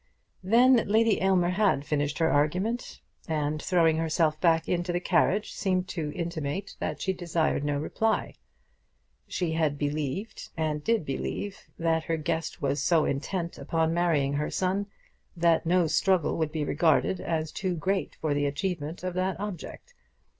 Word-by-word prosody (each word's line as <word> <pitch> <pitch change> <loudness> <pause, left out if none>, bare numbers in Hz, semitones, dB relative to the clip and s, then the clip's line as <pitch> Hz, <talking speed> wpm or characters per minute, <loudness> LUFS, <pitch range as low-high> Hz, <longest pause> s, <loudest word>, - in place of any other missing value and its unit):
Then 235 +4 +5
Lady 220 +1 +3
Aylmer 185 -2 +3
had 185 -7 +2
finished 145 -1 -1
her 165 - +2
argument, 180 +12 0 0.3
and 150 -1 -1
throwing 165 -3 +3
herself 160 -1 +1
back 165 -2 +3
into 175 0 0
the 175 - 0
carriage, 185 +3 +1
seemed 185 -2 0
to 155 -4 -3
intimate 170 +1 -4
that - - -3
she 190 - 0
desired 170 -5 0
no 145 0 0
reply. 220 +9 -1 0.9
She 175 -3 -2
had 155 -3 0
believed 150 +7 -3
and 155 -2 -1
did 225 -4 +1
believe 195 +8 -4
that 165 -1 0
her 165 - 0
guest 160 -1 -3
was 140 0 0
so 160 +1 +3
intent 170 +5 -3
upon 160 0 0
marrying 160 -5 +1
her 150 +1 -1
son, 190 +2 -1 0.5
that 165 -1 +3
no 180 0 +4
struggle 180 +1 +2
would 155 -1 0
be 155 -2 -2
regarded 165 +4 +2
as 160 -2 -2
too 185 -2 -2
great 190 +4 -1
for 155 -2 0
the 145 0 +1
achievement 155 +2 -3
of 185 -1 -2
that 185 +1 -1
object. 205 - -7
165 Hz, 155 wpm, -28 LUFS, 155-185 Hz, 0.9 s, Then